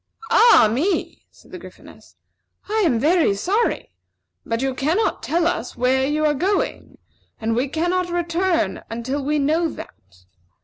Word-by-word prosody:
"Ah, 450 - +6
me!" 340 - -2
said - - -22
the - - -8
Gryphoness. - - -15 0.5
"I 435 +1 0
am 260 -10 +2
very 315 - +2
sorry; 405 - -1 0.5
but 230 +2 -3
you 270 -1 -1
cannot 315 +12 0
tell 335 +1 0
us 330 -8 -2
where 260 +2 +1
you 305 +1 0
are 300 - +3
going, 375 +8 -2 0.4
and 225 0 -1
we 250 +4 0
cannot 350 +5 -1
return 345 0 -1
until 260 +5 -4
we 300 +2 0
know 315 +4 +1
that. 90 - -13
305 Hz, 145 wpm, -21 LUFS, 255-350 Hz, 0.5 s, Ah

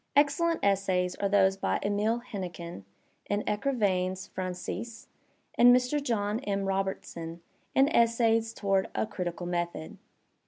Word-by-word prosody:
Excellent 300 +4 +3
essays 190 -2 +1
are 200 - 0
those 195 -1 +4
by - - 0
Emile 210 +3 +1
Hennequin 175 - -7 0.4
in 205 +1 0
"Ecrivains 200 -6 0
Francises," 185 +5 -5 0.5
and 245 +1 +7
Mr. 250 +4 +1
John 215 -5 -1
M. 200 -5 -2
Robertson 190 -3 -3 0.3
in 270 +1 +5
"Essays 230 -3 +3
Toward 195 -3 0
a - - +1
Critical 175 -4 -4
Method." 175 +2 -3
200 Hz, 120 wpm, -29 LUFS, 185-230 Hz, 0.5 s, and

